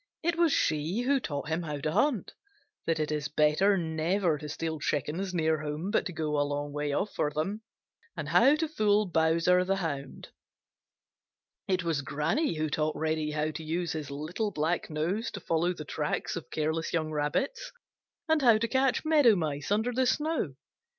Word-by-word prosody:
It 340 +1 +1
was 335 -2 +3
she 160 - +1
who 270 +2 +2
taught 145 - -4
him 160 +2 0
how 150 -3 -4
to 155 +2 -2
hunt, 260 - +1 0.5
that 165 -1 +1
it 155 0 -1
is 150 -1 -1
better 155 +7 +3
never 165 0 0
to 150 -1 -7
steal 160 +1 -3
chickens 155 +7 -2
near 160 -3 +1
home 155 +6 -3
but - - +1
to - - -6
go 155 -2 -1
a - - +4
long 145 0 -2
way 145 0 -2
off 195 +8 -1
for 150 - 0
them, 175 +9 -3 0.6
and 155 -2 -4
how 235 - +6
to 320 +1 -1
fool 215 -7 +2
Bowser 170 +1 +3
the 195 +1 +1
Hound. 145 -7 -5 1.4
It 185 -1 +1
was 165 -4 0
Granny 160 - 0
who 155 0 -1
taught 155 +1 -1
Reddy 155 -1 -1
how 155 +1 -1
to 155 +1 -7
use 170 +2 -2
his 155 -3 -4
little 155 +10 -3
black 165 0 -1
nose 170 +9 -1
to - - -5
follow 165 +2 0
the 155 -4 -7
tracks 150 0 -2
of 170 - -7
careless 160 +1 -2
young 155 -2 0
Rabbits, 155 - -1 0.6
and 320 -1 +3
how 235 -4 +6
to 230 +2 0
catch 260 +3 +1
Meadow 295 -8 +5
Mice 150 -5 -2
under 220 +4 +2
the 255 +1 +2
snow. 295 - 0
160 Hz, 185 wpm, -29 LUFS, 150-205 Hz, 1.4 s, how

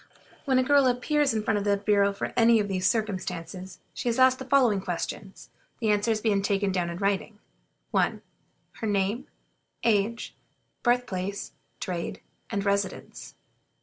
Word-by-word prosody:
When 265 -2 +3
a 255 - +4
girl 280 0 +4
appears 275 +3 +2
before 215 -1 0
the 200 0 +2
bureau 200 0 +3
under 200 - -4
any 230 -1 +5
of 205 - 0
these 185 -2 +1
circumstances, 185 -4 -3 0.2
she 245 - -2
is 235 - 0
asked 260 0 +5
the 265 - -6
following 250 -7 +3
questions, 190 +2 -5 0.3
the 220 -2 +2
answers 215 +1 +1
being 210 -3 +2
taken 200 0 +1
down 180 -2 -1
in 170 - -5
writing: 200 +2 -1 0.5
1. - - +1 0.5
Her 220 - -3
name, 205 +6 0 0.6
age, 225 +1 +1 0.5
birth 245 0 +2
place, 195 -1 -4 0.3
trade, 185 +3 -4 0.3
and 200 -2 -2
residence? 200 -1 -2
205 Hz, 150 wpm, -27 LUFS, 195-235 Hz, 0.6 s, any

